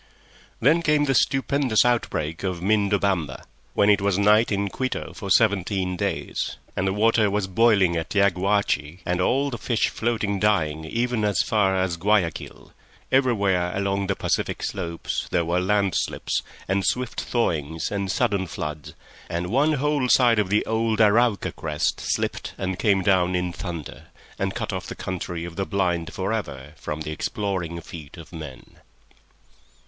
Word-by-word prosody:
Then 150 +8 +4
came 150 -2 +2
the 135 - +1
stupendous 135 -3 +2
outbreak 80 -10 0
of 90 -3 -2
Mindobamba, 100 -6 +1 0.3
when 100 - +4
it 105 -2 +4
was 100 -2 +1
night 105 +3 +4
in 100 0 0
Quito 130 +6 -3
for 100 - -7
seventeen 95 -3 +2
days, - - -3 0.2
and 95 - 0
the - - +2
water 110 0 +3
was 105 0 0
boiling 95 -3 +3
at 80 +4 -3
Yaguachi 95 -4 +1
and 90 +1 0
all 135 +8 +1
the 120 - -5
fish 115 -1 +1
floating 110 -4 -1
dying 80 -7 +1
even 120 +5 -1
as 105 -4 +2
far 100 -3 +2
as 95 -2 0
Guayaquil; 95 -3 -1 0.4
everywhere 100 -9 +2
along 100 0 -1
the 100 - 0
Pacific - - -1
slopes 85 -4 -3
there 85 - +1
were 85 +2 +1
land 100 +1 +1
slips - - -1 0.3
and 95 0 +1
swift 125 +2 -1
thawings 80 - -1
and 100 -2 -2
sudden 105 -4 0
floods, 75 -2 -6 0.3
and 85 +2 -3
one 145 +6 +3
whole 145 -2 0
side 120 -4 +5
of 100 -3 0
the 105 +2 +2
old 110 0 0
Arauca 110 0 +3
crest 75 -2 -2
slipped - - -2
and 95 -1 -3
came 100 -3 +2
down 90 -1 +3
in 90 -1 -1
thunder, 85 -6 -7 0.3
and - - -1
cut - - -3
off - - -4
the - - -6
Country 90 -2 -4
of 85 0 -9
the 95 - -1
Blind 85 -4 0
for 95 +3 -2
ever 75 -9 -5
from 75 +1 -5
the 75 - -4
exploring 90 0 -3
feet 80 -3 -10
of 80 +1 -12
men. 75 -5 -10
100 Hz, 160 wpm, -24 LUFS, 85-110 Hz, 0.4 s, side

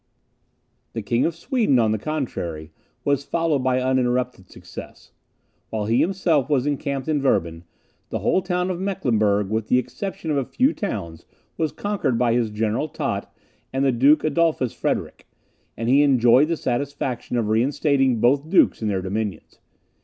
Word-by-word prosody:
The 115 - -4
King 120 +6 +1
of 165 - -4
Sweden, 215 - +1
on 110 -2 +3
the 110 - -1
contrary, 90 - -4 0.3
was 140 -1 +1
followed 165 -1 0
by 130 0 +1
uninterrupted 125 -5 0
success. - - -11 0.6
While 110 -2 -2
he 115 +3 +2
himself 170 -7 +1
was 140 -3 +2
encamped 140 -1 -2
in 150 -2 +1
Werben, 85 -10 0 0.4
the - - -2
whole - - +2
of 180 0 0
Mecklenburg, 110 - 0
with 110 0 -1
the 125 - +3
exception 160 - -4
of 145 - +1
a 135 - +1
few 260 - +1
towns, 85 - -5 0.3
was 160 -2 -1
conquered 205 - -1
by 120 -1 +2
his 120 -2 +1
General 110 +6 -1
Tott - - -4 0.4
and 135 +1 0
the 135 - +4
Duke 135 +6 +4
Adolphus 155 -5 +1
Frederick; - - -3 0.5
and 115 - -3
he 135 +4 +5
enjoyed 130 0 +5
the 165 0 -1
satisfaction 130 -2 -2
of 110 -3 0
reinstating 135 +2 +2
both 140 +6 +2
dukes 185 - +4
in 110 - -1
their 95 -3 -1
dominions. 100 -2 -4
130 Hz, 160 wpm, -23 LUFS, 115-150 Hz, 0.6 s, he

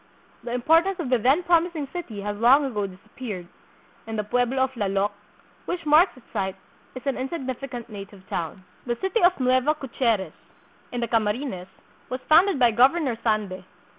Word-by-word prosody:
The 240 - -5
importance 330 +9 +3
of 280 -7 -3
the 250 - +4
then 270 +10 +3
promising 340 -4 +1
city 250 - -5
has 205 +1 -3
long 255 +7 +5
ago 210 -7 -2
disappeared, 190 +1 -8 0.6
and 225 0 -4
the 210 - 0
pueblo 245 +4 +1
of 265 - -1
Lallok, 200 -3 0 0.5
which 345 -2 -4
marks 305 +2 +5
its 255 - -17
site, 190 0 -1 0.4
is 255 - -8
an 275 -2 -1
insignificant 260 -3 -5
native 200 -3 -10
town. 170 +3 -4 0.2
The 240 - 0
City 385 +4 0
of 355 -2 +4
Nueva 255 +4 +3
Caceres, 230 - -1 0.6
in 245 - -3
the 235 - 0
Camarines, 215 -3 -1 0.4
was 255 - -3
founded 345 +2 +5
by 245 -3 +5
Governor 260 +3 +3
Sande. 210 -5 -1
250 Hz, 165 wpm, -25 LUFS, 210-290 Hz, 0.6 s, long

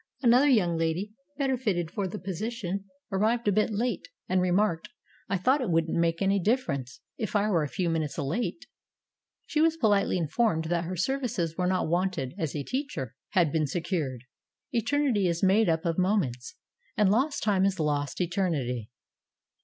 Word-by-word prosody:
Another 250 +4 +5
young 180 -10 +3
lady, 165 +6 -1 0.2
better 270 -2 +1
fitted 180 -9 -1
for 200 0 -2
the - - -6
position, 195 +1 -4 0.3
arrived 220 +4 +1
a - - +5
bit 210 +2 +2
late, 220 -4 -2 0.2
and 185 0 +2
remarked, 180 -1 +1 0.4
"I 200 - +1
thought 260 +10 +2
it 240 - -1
wouldn't 165 -1 +1
make 170 +2 +1
any 195 +1 +3
difference 155 - -1 0.2
if 220 -1 -3
I 205 0 +3
were 170 -4 +3
a 150 - -1
few 180 +4 -1
minutes 160 -3 -1
late." 165 - -2 0.8
She 305 - 0
was 325 0 +3
politely 205 - +2
informed 165 0 +1
that 170 +1 0
her 185 +2 -4
services 215 - -1
were 180 0 0
not 185 -2 +1
wanted, 170 -6 -1
as 160 -4 -2
a 145 - -2
teacher 255 - -4 0.2
had 175 -7 +3
been 155 -1 +1
secured. 155 - -2 0.5
Eternity 240 -4 +1
is 170 +1 -1
made 195 +2 +4
up 160 +1 0
of 165 +1 0
mo 190 +4 +3
ments, 125 - -3 0.4
and 210 -3 +4
"lost 270 +7 +1
time 200 -3 +2
is 195 -2 +1
lost 145 -3 -1
eternity." 160 - -1
185 Hz, 175 wpm, -28 LUFS, 165-215 Hz, 0.8 s, Another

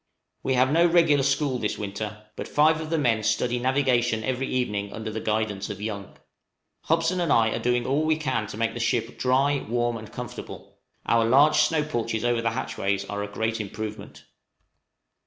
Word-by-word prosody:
We 130 - 0
have 130 +2 +3
no 170 +3 +5
regular 165 -4 +4
school 140 -1 +1
this 105 - -2
winter, 105 +1 -5
but - - -6
five 155 +2 +3
of 155 - -6
the 165 - +1
men 120 -7 +2
study 120 +3 0
navigation 125 -3 +1
every 130 +3 -1
evening 105 -5 -2
under 110 0 -5
the 110 - -4
guidance 110 -2 -2
of 100 -2 -6
Young. 100 -2 -6 0.7
Hobson 165 +3 +1
and 170 -4 0
I 115 -1 +4
are - - -2
doing 120 0 0
all 140 +3 +1
we 155 0 +2
can 130 -8 -1
to 110 - -8
make 115 0 0
the 120 - -6
ship 115 0 -1
dry, 135 +2 +2
warm, 120 0 0
and 110 -1 -10
comfortable: 125 -1 -9 0.3
our 115 0 +3
large 140 +7 +5
snow 160 -2 +3
porches 115 -6 -2
over 120 -1 +1
the 115 - +1
hatchways 100 -5 -2
are 100 0 -4
a 100 - -3
great 110 +1 -1
improvement. 105 +1 -7
120 Hz, 190 wpm, -25 LUFS, 110-140 Hz, 0.7 s, no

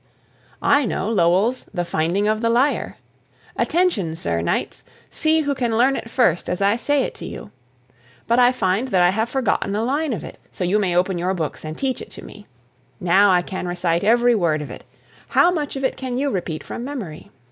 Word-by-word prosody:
I 285 0 +4
know 205 0 -2
Lowell's 200 +5 +2
"The 175 -1 -2
Finding 170 +6 0
of 215 0 0
the 230 - +1
Lyre." 250 +5 +1 0.6
Attention, 310 - +1
Sir 85 - -2
Knights! 85 - -2 0.3
See 315 0 +2
who 285 -2 0
can 240 -4 -1
learn 260 +3 +4
it 225 - -6
first 225 -9 +1
as 180 - -2
I 200 +2 +3
say 280 +3 +1
it - - -4
to - - -9
you. - - -9 0.7
But 235 +2 +2
I 245 0 +6
find 205 0 0
that 185 -7 +3
I 175 - +5
have 220 +4 -1
forgotten 235 -6 0
a 215 - 0
line 285 +5 0
of 190 - -5
it, - - -10
so - - -5
you 190 +4 +2
may 180 -4 0
open 180 0 +1
your 185 +2 0
books 160 -4 -4
and 155 0 -6
teach 265 -2 -2
it - - -9
to - - -10
me. 205 - -13 0.5
Now, 190 +3 +4
I 180 -1 +3
can 185 0 -5
recite 175 -1 0
every 240 +3 +4
word 165 -8 +1
of - - -9
it. - - -10 0.4
How 350 - +4
much 300 -5 -3
of 270 - -4
it 260 - 0
can 255 -2 -4
you 280 +1 0
repeat 170 -6 -3
from 235 - -6
memory? 235 - -7
210 Hz, 210 wpm, -21 LUFS, 180-255 Hz, 0.7 s, I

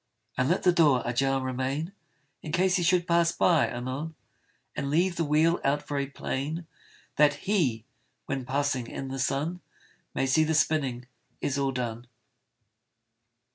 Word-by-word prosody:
And 130 +1 +1
let 180 - +1
the 180 - +6
door 150 -7 +4
ajar 135 +3 +1
remain, 130 +6 -2 0.5
In 155 - -6
case 185 +2 +2
he - - 0
should 175 0 +3
pass 170 -1 +3
by 165 -3 +3
anon; 130 +6 -5 0.6
And 140 - -2
leave 175 +4 +2
the 170 - 0
wheel 160 +3 +3
out 145 +2 0
very 140 -1 -1
plain, 145 +4 -4 0.5
That 145 -1 +5
HE, 135 - +1 0.4
when 135 -1 -3
passing 135 -1 -1
in 135 +2 -6
the 135 0 -4
sun, 150 +7 -1 0.5
May - - +1
see 140 +4 +3
the 160 0 0
spinning 135 -6 +1 0.3
is 140 0 -1
all 135 -1 +1
done. 120 -2 -4
145 Hz, 150 wpm, -28 LUFS, 130-165 Hz, 0.6 s, the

